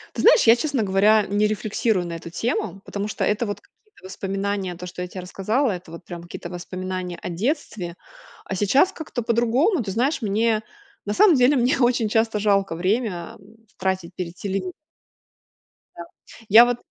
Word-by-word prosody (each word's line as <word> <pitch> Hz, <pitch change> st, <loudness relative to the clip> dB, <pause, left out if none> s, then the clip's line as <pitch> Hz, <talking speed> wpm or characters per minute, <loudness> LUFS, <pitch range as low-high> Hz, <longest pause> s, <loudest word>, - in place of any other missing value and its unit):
Ты -, -, -2 dB
знаешь, -, -, +6 dB
я, 230 Hz, -, +8 dB
честно 255 Hz, -2 st, -1 dB
говоря, 205 Hz, +2 st, +4 dB
не 205 Hz, +1 st, +1 dB
рефлексирую 215 Hz, -2 st, 0 dB
на 170 Hz, -, -6 dB
эту 165 Hz, 0 st, -8 dB
тему. 195 Hz, 0 st, -2 dB
Потому 205 Hz, +1 st, -4 dB
что -, -, -2 dB
это 210 Hz, +3 st, 0 dB
вот 205 Hz, -, -4 dB
какие-то 425 Hz, -, -27 dB
воспоминания, 195 Hz, -1 st, -3 dB
то, 180 Hz, +1 st, -8 dB
что 180 Hz, 0 st, -6 dB
я 180 Hz, -, -5 dB
те 185 Hz, -, -9 dB
рассказала, 210 Hz, +7 st, 0 dB
это 180 Hz, -2 st, -8 dB
вот 170 Hz, +1 st, -10 dB
прям 170 Hz, -1 st, -8 dB
какие-то 175 Hz, 0 st, -8 dB
воспоминания 185 Hz, 0 st, -5 dB
о -, -, -5 dB
детстве, 185 Hz, -, -3 dB, 0.5 s
а -, -, -4 dB
сейчас 265 Hz, -, +3 dB
как-то 310 Hz, -8 st, -5 dB
по-другому. 240 Hz, -, +2 dB
Ты 200 Hz, -, -5 dB
знаешь, 255 Hz, +8 st, 0 dB
мне 215 Hz, +1 st, +1 dB, 0.4 s
на 205 Hz, -, -2 dB
самом 380 Hz, -, +6 dB
деле 260 Hz, +2 st, +4 dB
мне 250 Hz, +2 st, +2 dB
очень 240 Hz, -3 st, +2 dB
часто 225 Hz, 0 st, +1 dB
жалко 195 Hz, -4 st, +1 dB
время, 185 Hz, -1 st, -1 dB
м, 205 Hz, +3 st, -19 dB, 0.2 s
тратить 190 Hz, -2 st, -2 dB
перед 175 Hz, -1 st, -6 dB
телевиз 190 Hz, -2 st, -3 dB, 1.2 s
Да. 170 Hz, -, -6 dB, 0.5 s
Я 230 Hz, +4 st, +9 dB
вот 245 Hz, -1 st, 0 dB
205 Hz, 175 wpm, -23 LUFS, 185-235 Hz, 1.2 s, Я